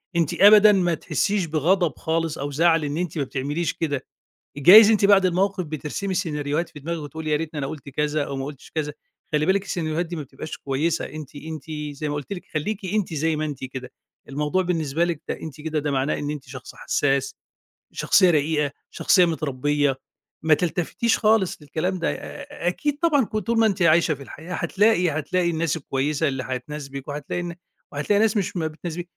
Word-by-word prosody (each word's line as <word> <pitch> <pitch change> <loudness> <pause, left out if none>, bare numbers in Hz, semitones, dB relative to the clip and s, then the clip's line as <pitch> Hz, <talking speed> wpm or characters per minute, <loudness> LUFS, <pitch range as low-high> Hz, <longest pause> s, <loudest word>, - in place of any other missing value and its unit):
أنتِ 165 -3 +1
أبدًا 210 +1 +9
ما 180 -4 +2
تحسّيش 195 +3 0
بغضب 165 -1 +1
خالص 165 -1 -1
أو 145 +1 -4
زعل 165 +2 +3
إن 145 +1 -3
أنتِ 175 -2 -3
ما 145 - +1
بتعمليش 140 +5 -2
كده، 145 -5 -2 0.5
جايز 205 +9 +9
أنتِ 210 -2 +3
بعد 200 -1 +6
الموقف 185 +1 +1
بترسمي 155 +5 -4
سيناريوهات 150 -2 -1
في 150 - -12
دماغِك 170 +3 -3
وتقولي 155 +2 -5
يا 150 - +3
ريتني 155 0 -4
أنا 135 - -2
قُلت 145 -1 -8
كذا 150 +2 -1
أو 140 - -5
ما 135 - -3
قُلتش 140 -1 -9
كذا. 150 -2 -2 0.4
خلّي 150 +1 +2
بالِك 195 +1 +2
السيناريوهات 170 -2 -2
دي 170 +1 -6
ما 155 - -4
بتبقاش 140 +3 -8
كويسة 145 +5 -1
أنتِ 150 -1 -9
أنتِ 160 +2 -8 0.3
زي 150 +1 -3
ما 145 - -2
قُلت 145 +6 -5
لِك 180 - -6
خلّيكِ 190 +7 -2
أنتِ 190 -3 -1
زي 160 +1 0
ما 155 - -1
أنتِ 140 -3 -5
كده، 130 -1 -7 0.4
الموضوع 150 +6 0
بالنسبة 165 -3 0
لِك 170 -3 -3
ده - - -1
أنتِ 155 -1 -8
كده 155 0 -2
ده 150 -1 -1
معناه 135 +1 0
إن 145 - -3
أنتِ 150 -3 -6
شخص 130 -1 -9
حسّاس، 135 -1 0 0.6
شخصية 185 - +4
رقيقة، 150 -2 +1 0.2
شخصية 180 -2 +4
متربية. 145 -3 0 0.5
ما 160 -1 +5
تلتفتيش 180 +7 0
خالص 215 -6 +2
للكلام 165 +6 -2
ده 165 - 0
آآ، 170 - -7
أكيد 290 - -1
طبعًا 290 -7 +3
ك 215 - -4
طول 225 +3 0
ما 225 - +5
أنتِ 195 -3 -2
عايشة 170 -1 +4
في 140 - -9
الحياة 160 +6 -9
هتلاقي، 195 -2 +2
هتلاقي 155 +4 0
الناس 165 -1 0
الكويسة 145 +2 -1
اللي 135 -2 -2
هتناسبِك 135 +2 -6
وهتلاقي 145 +4 -4
ن 170 -1 -5 0.4
وهتلاقي 155 +8 +1
ناس 220 -1 +3
مش 195 -2 -1
ما 160 - 0
بتناسبِ 165 +2 -6
160 Hz, 195 wpm, -23 LUFS, 145-180 Hz, 0.6 s, أبدًا